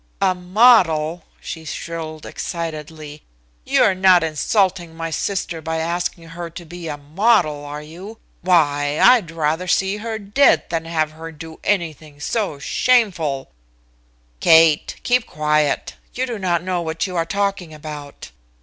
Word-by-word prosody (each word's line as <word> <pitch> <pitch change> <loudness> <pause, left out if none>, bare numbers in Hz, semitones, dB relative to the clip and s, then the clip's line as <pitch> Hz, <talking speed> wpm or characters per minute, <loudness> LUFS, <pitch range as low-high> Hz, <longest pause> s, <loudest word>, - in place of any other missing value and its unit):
"A 185 - +3
model!" 180 -4 +3
she 160 - -7
shrilled 160 0 -6
excitedly. 155 -3 -6 0.4
"You're - - +4
not 185 -2 +5
insulting 175 +2 0
my 165 0 -4
sister 175 -2 -2
by 160 +1 -3
asking 170 0 -3
her 170 +1 -7
to 170 +1 -10
be 170 +1 -8
a 150 -2 -4
model, 155 0 +1
are 145 +1 -7
you? 185 +8 -10 0.2
Why, 145 -5 +2
I'd 230 -10 +5
rather 165 +2 -1
see 195 +3 +1
her 220 +1 -4
dead 205 - +3
than 165 -1 -2
have 160 -2 -1
her 165 +1 -9
do 160 +1 -11
anything 155 -6 -2
so 195 0 -2
shameful 165 - +1 0.5
" - - -38
"Kate, 160 - +5
keep 250 -1 +1
quiet. 150 -1 0 0.2
You 255 - 0
do 235 -4 -5
not 175 -3 0
know 180 -1 -1
what 160 -1 -2
you 185 -2 -6
are 165 - +2
talking 195 -1 -2
about." 150 -2 -9
165 Hz, 145 wpm, -20 LUFS, 155-185 Hz, 0.5 s, not